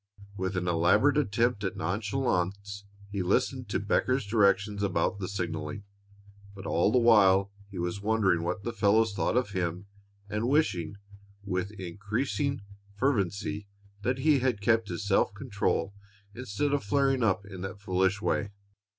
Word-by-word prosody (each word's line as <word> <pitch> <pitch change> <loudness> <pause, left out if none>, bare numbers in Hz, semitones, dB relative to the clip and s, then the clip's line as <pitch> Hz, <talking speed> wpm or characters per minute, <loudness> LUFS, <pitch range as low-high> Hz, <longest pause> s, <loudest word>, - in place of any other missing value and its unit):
With 95 0 -2
an 90 0 -1
elaborate 90 - +3
attempt 115 -3 0
at 95 - -3
nonchalance, 100 0 -2 0.3
he 100 -1 -2
listened 125 +5 0
to - - 0
Becker's 125 +5 +1
directions 100 -1 +2
about 95 0 0
the 95 - -3
signaling, 85 -1 -4 0.7
but 95 0 -9
all 85 +3 +2
the 125 - +3
while 100 -5 +5 0.2
he 95 - -9
was 90 +3 -3
wondering 100 -5 +2
what 90 +4 -3
the 120 - -3
fellows 110 0 +3
thought 110 - 0
of 125 -5 0
him 90 0 -2 0.4
and 105 +4 -1
wishing, 100 - +1 0.5
with 95 -1 -2
increasing 105 - -2 0.3
fervency, 100 -4 -1 0.3
that 125 +4 0
he 145 +1 +3
had 125 -4 0
kept 110 +1 +2
his 90 +3 -4
self 100 0 +2
control 105 -4 -1 0.4
instead 125 +4 -2
of 145 - 0
flaring 135 +4 +2
up 100 -3 +1
in 95 -3 -9
that 95 +1 -6
foolish 95 +1 0
way. 100 - 0
100 Hz, 150 wpm, -29 LUFS, 95-115 Hz, 0.7 s, while